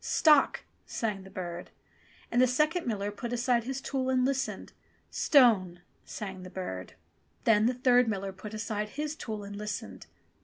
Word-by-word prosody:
"Stock 300 -3 +4
!" - - -41
sang 210 -4 -2
the 190 - -12
bird. 175 -2 -6 0.6
And 245 - +3
the 255 - +6
second 305 +5 +1
miller 205 -3 -1
put 235 +3 -6
aside 245 -1 +1
his 265 +1 -3
tool 265 -1 -2
and 255 -1 +3
listened. 270 0 -2 0.4
"Stone," 200 - +4 0.2
sang 190 -3 -6
the 185 - -9
bird. 95 - -6 0.5
Then 220 -1 +4
the 250 - +1
third 250 -1 +4
miller 195 -3 -2
put 210 +2 -8
aside 215 -1 -3
his 300 +1 -2
tool 215 -7 -5
and 200 0 -8
listened. 200 - -6
220 Hz, 165 wpm, -29 LUFS, 195-255 Hz, 0.6 s, the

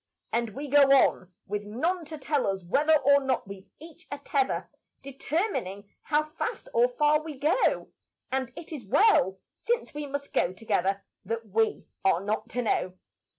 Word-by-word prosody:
And 230 -2 -1
we 290 +2 -5
go 290 +1 +5
on 190 -8 +4
with 205 +1 -3
none 330 - -1
to 310 +1 -7
tell 285 -2 0
us 195 -1 -2
whether 300 - +3
Or 280 +1 +5
not 260 -6 -1
we've 195 0 -10
each 330 +2 -14
a 285 - -3
tether 275 -2 -1 0.4
Determining 270 - -3
how 300 0 +1
fast 310 +10 -5
or 480 0 +5
far 305 -11 +2
we 310 -3 -8
go; 300 - +1 0.4
And 260 -2 -1
it 335 - -10
is 285 -6 -6
well, 195 - +4 0.2
since 475 -5 -2
we 295 0 -5
must 280 0 -5
go 180 - +1
together, 195 -1 -1 0.2
That 225 +2 -4
we 220 +3 0 0.2
are 190 -3 +3
not 210 +3 -3
to 245 +1 -2
know. 185 -4 0
270 Hz, 170 wpm, -27 LUFS, 205-305 Hz, 0.4 s, go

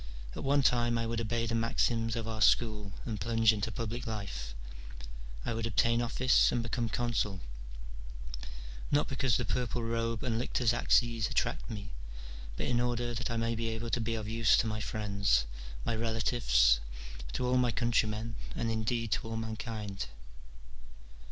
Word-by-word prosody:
At - - -5
one 140 +1 +3
time 120 -1 +3
I 115 - 0
would 115 0 -1
obey 115 +1 -1
the 115 - -2
maxims 115 0 +1
of 115 -1 -3
our 110 -1 -4
school 105 -3 +3
and 110 -5 -4
plunge 115 +1 +4
into 110 +2 -2
public 115 +3 -4
life, 75 - -5 0.9
I - - -1
would 115 0 -1
obtain 115 +2 +2
office 130 +2 +4
and 120 -1 0
become 120 -1 -1
consul, 115 -4 0 1.5
not 145 +1 +3
because 130 -3 +1
the 120 - -1
purple 120 +1 -1
robe 115 -1 -1
and 115 -2 0
lictor's 120 -1 +1
axes 115 -2 +2
attract - - -1
me, 105 - -6 0.7
but - - -2
in 120 -1 +2
order 120 0 0
that 125 +2 -2
I 115 - -1
may 115 0 0
be 115 0 -2
able 115 +1 -4
to 120 - +1
be 115 0 -1
of 110 -1 -4
use 115 0 +4
to - - +2
my 110 -1 -2
friends, 100 - +1 0.4
my 115 - 0
relatives, 110 - +3 0.5
to 125 - -1
all 125 +1 +3
my 125 -1 +3
countrymen, 115 -1 0 0.2
and 115 -1 -1
indeed 115 0 -1
to - - 0
all 115 0 -3
mankind. 110 - -4
115 Hz, 165 wpm, -32 LUFS, 110-120 Hz, 1.5 s, plunge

